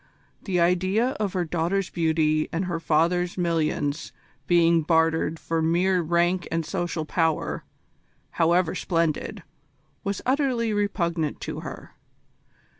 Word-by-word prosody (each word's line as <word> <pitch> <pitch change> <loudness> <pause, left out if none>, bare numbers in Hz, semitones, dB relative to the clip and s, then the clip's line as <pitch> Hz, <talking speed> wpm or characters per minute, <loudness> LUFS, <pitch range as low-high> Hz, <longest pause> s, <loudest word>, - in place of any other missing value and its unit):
The 185 -4 -1
idea 185 +7 +2
of 205 -3 -1
her 180 -2 0
daughter's 175 +4 -1
beauty 160 -2 +1
and 175 +3 -1
her 175 -2 -2
father's 170 +3 +1
millions 160 -3 -1 0.4
being 170 -1 +4
bartered 160 0 +2
for 165 0 -2
mere 180 +3 +2
rank 175 +2 +1
and 165 0 -1
social 170 -1 -2
power, 160 0 0 0.7
however 170 +1 +2
splendid, 165 -3 -1 0.6
was 200 -2 -2
utterly 255 -4 +1
repugnant 170 -7 -1
to - - -5
her. - - -9
170 Hz, 115 wpm, -25 LUFS, 160-185 Hz, 0.7 s, being